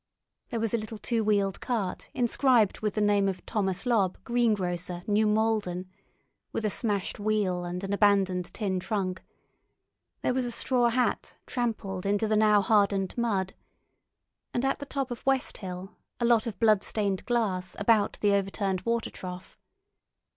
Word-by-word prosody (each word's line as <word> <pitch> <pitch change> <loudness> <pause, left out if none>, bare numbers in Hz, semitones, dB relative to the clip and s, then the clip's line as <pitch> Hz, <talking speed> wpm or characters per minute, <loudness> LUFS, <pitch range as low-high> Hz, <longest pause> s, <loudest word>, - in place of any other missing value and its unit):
There 230 - -2
was 225 -1 -1
a 235 - +2
little 215 +1 -7
two 225 +1 -1
wheeled 200 -3 +1
cart 220 -7 -3
inscribed 240 -3 +3
with 210 -1 -2
the 215 - +1
name 205 -1 +3
of 190 - -6
Thomas 195 -3 -1
Lobb, 205 -7 +2
Greengrocer, 185 -7 0
New 210 +1 +2
Malden, 210 -4 0 0.6
with 220 - -2
a 210 - +1
smashed 205 -4 -1
wheel 205 -4 0
and 175 +2 -4
an 195 +1 -2
abandoned 195 -3 +2
tin 190 -4 -2
trunk; 185 -2 -2 1.0
there - - +2
was 255 0 0
a - - -2
straw 240 0 +2
hat 250 +2 0
trampled 205 -6 -2
into 205 +2 +1
the 215 - +2
now 210 -1 +5
hardened 200 -2 +2
mud, 200 -6 0 1.0
and 245 +2 +1
at 270 - 0
the 285 - -7
top 275 -3 -3
of 240 - -6
West 270 -1 0
Hill 185 0 -7 0.2
a 240 - +1
lot 235 -1 +3
of 225 - -5
blood 215 -3 +4
stained 200 -3 -1
glass 195 -7 0
about 210 0 +2
the 205 -1 +3
overturned 195 -1 0
water 230 +3 -1
trough. 180 0 -9
210 Hz, 160 wpm, -28 LUFS, 190-230 Hz, 1.0 s, now